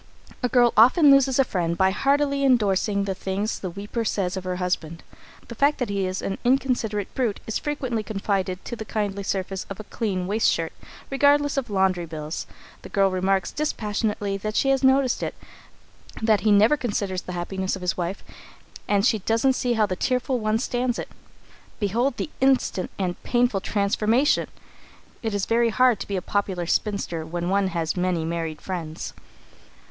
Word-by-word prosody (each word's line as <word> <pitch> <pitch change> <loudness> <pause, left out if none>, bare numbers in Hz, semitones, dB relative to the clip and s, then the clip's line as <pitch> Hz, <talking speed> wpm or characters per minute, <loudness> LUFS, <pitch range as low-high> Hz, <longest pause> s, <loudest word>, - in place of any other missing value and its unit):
A 250 - 0
girl 245 -1 +4
often 275 - +7
loses 275 -2 +4
a 270 - +6
friend 170 -7 -2
by 190 0 +4
heartily 280 +5 +1
endorsing 205 -5 +2
the 195 -1 -2
things 195 +3 -3
the 185 - -4
weeper 205 +6 -4
says 195 -4 -1
of 190 -1 -5
her 180 0 -2
husband. 175 -3 -3 0.4
The - - -7
fact 285 +6 +2
that 245 -5 -2
he 195 -2 0
is 185 +1 -4
an 195 - -3
inconsiderate 245 -5 0
brute 235 -6 -1
is 220 - -2
frequently 260 -6 -2
confided 195 -3 -2
to 240 - -4
the 220 - -6
kindly 205 -2 -2
surface 190 -1 -3
of 195 - -7
a - - -6
clean 200 -3 -2 0.2
shirt 165 -6 +1
waist, - - -17 0.2
regardless 285 +1 +3
of 270 -4 -2
laundry 190 -3 +1
bills. 155 0 -5 0.3
The - - -10
girl 195 -1 +2
remarks 190 +1 0
dispassionately 210 -7 -2
that 215 +2 -4
she 270 - +2
has 270 0 +2
noticed 265 -1 +3
it; - - -3 0.8
that 220 -3 +3
he 215 +2 +3
never 215 +8 +5
considers 200 -7 -2
the 180 - -7
happiness 190 +2 -2
of 190 - -8
his 180 - 0
wife, 180 +2 -4 0.6
and 200 0 +2
she 220 -3 +3
doesn't 230 +6 +2
see 250 -1 0
how 220 -2 +3
the 185 -2 -3
tearful 255 +4 0
one 215 0 +1
stands 245 +1 -1
it. - - -5 0.7
Behold 235 +6 0
the - - -4
instant 265 -8 +2
and 180 -2 -3
painful 240 -5 +1
transformation! 215 +7 +1 0.7
It 220 -3 -2
is 200 - 0
very 230 0 +2
hard 245 -1 +3
to - - -6
be 200 - -3
a 180 - -4
popular 190 -4 -1
spinster 175 -3 -1
when 170 +2 -3
one 195 0 +2
has 165 -3 -2
many 180 -3 0
married 165 -2 -3
friends. 165 -4 -5
205 Hz, 180 wpm, -24 LUFS, 185-245 Hz, 0.8 s, often